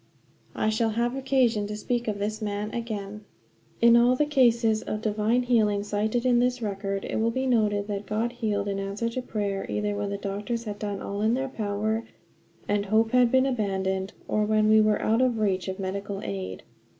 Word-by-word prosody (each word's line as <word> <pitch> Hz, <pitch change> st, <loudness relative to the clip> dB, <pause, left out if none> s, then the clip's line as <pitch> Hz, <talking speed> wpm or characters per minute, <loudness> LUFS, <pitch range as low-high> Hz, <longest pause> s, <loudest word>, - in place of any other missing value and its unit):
I 215 Hz, -, +1 dB
shall 225 Hz, +1 st, +1 dB
have 240 Hz, +2 st, +1 dB
occasion 255 Hz, -6 st, +1 dB
to 210 Hz, -, -5 dB
speak 240 Hz, +2 st, -2 dB
of 210 Hz, -2 st, -1 dB
this 215 Hz, +2 st, -3 dB
man 210 Hz, 0 st, -3 dB
again. 210 Hz, -3 st, -5 dB, 0.6 s
In 235 Hz, 0 st, +7 dB
all 240 Hz, +2 st, +5 dB
the 300 Hz, -, +2 dB
cases 235 Hz, -6 st, +3 dB
of 210 Hz, -, -4 dB
divine 220 Hz, +3 st, +1 dB
healing 215 Hz, -4 st, +2 dB
cited 215 Hz, +4 st, -1 dB
in 245 Hz, -1 st, +4 dB
this 250 Hz, +1 st, +1 dB
record 195 Hz, -2 st, -3 dB
it -, -, -3 dB
will 225 Hz, +1 st, +2 dB
be 260 Hz, +3 st, -1 dB
noted 210 Hz, -5 st, +2 dB
that 205 Hz, -1 st, -4 dB
God 225 Hz, +3 st, -1 dB
healed 210 Hz, -4 st, -2 dB
in 195 Hz, -1 st, -2 dB
answer 200 Hz, +4 st, -2 dB
to 255 Hz, +2 st, -3 dB
prayer 200 Hz, -5 st, -2 dB
either 210 Hz, 0 st, -1 dB
when 205 Hz, 0 st, -2 dB
the 200 Hz, -, -3 dB
doctors 205 Hz, +4 st, -3 dB
had 205 Hz, -2 st, -6 dB
done 205 Hz, -2 st, -4 dB
all 200 Hz, +1 st, -4 dB
in 220 Hz, +2 st, +2 dB
their 265 Hz, +1 st, -2 dB
power 215 Hz, 0 st, -2 dB, 0.6 s
and 205 Hz, 0 st, 0 dB
hope 220 Hz, +2 st, +2 dB
had 250 Hz, -2 st, +4 dB
been 260 Hz, 0 st, +4 dB
abandoned, 190 Hz, -5 st, -1 dB, 0.2 s
or 215 Hz, -, +1 dB
when 215 Hz, 0 st, +2 dB
we 220 Hz, 0 st, +6 dB
were 215 Hz, -1 st, +2 dB
out 225 Hz, +3 st, +2 dB
of 250 Hz, -3 st, +2 dB
reach 195 Hz, -4 st, 0 dB
of 190 Hz, 0 st, -3 dB
medical 195 Hz, +1 st, -4 dB
aid. 95 Hz, -2 st, -5 dB
215 Hz, 200 wpm, -26 LUFS, 205-235 Hz, 0.6 s, In